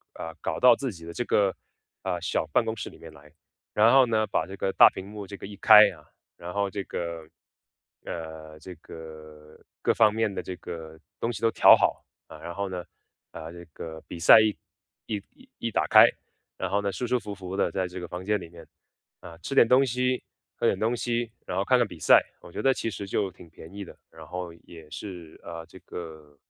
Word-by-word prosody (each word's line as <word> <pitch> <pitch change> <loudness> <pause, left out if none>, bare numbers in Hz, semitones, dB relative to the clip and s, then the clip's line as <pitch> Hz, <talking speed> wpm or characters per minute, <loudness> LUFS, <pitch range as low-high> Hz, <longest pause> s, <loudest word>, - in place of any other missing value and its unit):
呃， 80 - -7
搞 80 - -3
到 125 -1 +7
自 135 +1 -3
己 85 -4 -12
的 85 - -8
这 120 - -2
个， 100 -4 +2 0.5
呃， - - -2
小 - - -1
办 95 +10 +1
公 110 0 -2
室 110 - -6
里 - - -16
面 80 -1 -12
来。 75 0 -17 0.4
然 110 +3 +5
后 135 -1 +6
呢 110 -1 +1
把 80 - -1
这 95 - -8
个 95 - -1
大 - - +8
屏 95 - -8
幕 105 -1 -8
这 100 +1 -8
个 - - -9
一 100 +1 -9
开 105 +1 +9
啊， 75 -4 -15 0.3
然 85 +1 -7
后 100 +1 0
这 100 0 -4
个， 85 -2 -5 0.8
呃 80 -1 -7
这 90 +4 -10
个 75 -1 -12 0.3
各 - - +3
方 110 -2 +5
面 110 -2 0
的 - - -3
这 95 - -6
个 80 -3 -9 0.2
东 115 - -1
西 105 -3 -7
都 115 - +4
调 - - +8
好， - - 0 0.2
啊， 80 - -12
然 85 +2 -8
后 100 +1 -2
呢， 90 -1 -5 0.5
呃， 80 0 -9
这 85 0 -10
个 80 -1 -8
比 - - -7
赛 85 - +9
一 110 -1 +1 0.5
一 105 -2 -3
一 260 0 -20 0.2
一 - - -3
打 - - +1
开， - - +8 0.5
然 - - -3
后 100 +1 +1
呢， 100 -1 -1
舒 110 +6 -4
舒 125 +1 +1
服 105 -3 -7
服 95 -1 -7
地 100 - +1
在 95 -2 -1
这 90 +1 -8
个 90 - -6
房 90 +2 -7
间 105 +1 +1
里 85 - -10
面， 85 0 -13 0.5
啊， 85 -2 -12
吃 135 - -4
点 120 - +6
东 130 +3 +5
西、 125 +1 -1 0.3
喝 - - -2
点 - - +3
东 115 +3 0
西， 120 -1 -2
然 90 - -4
后 95 - +2
看 125 +5 +3
看 120 -3 +2
比 85 -4 -12
赛。 - - +7 0.2
我 - - -13
觉 - - -5
得 135 0 +4
其 115 - -3
实 100 -2 -6
就 100 0 -1
挺 90 -1 -15
便 80 +1 -13
宜 100 0 -7
的， - - -13
然 80 -1 -13
后 90 +2 -6
也 80 -3 -13
是， 85 -2 -9
呃， 85 -1 -7
这 90 - -14
个， 80 -4 -10
95 Hz, 250 characters per minute, -26 LUFS, 80-110 Hz, 0.8 s, 开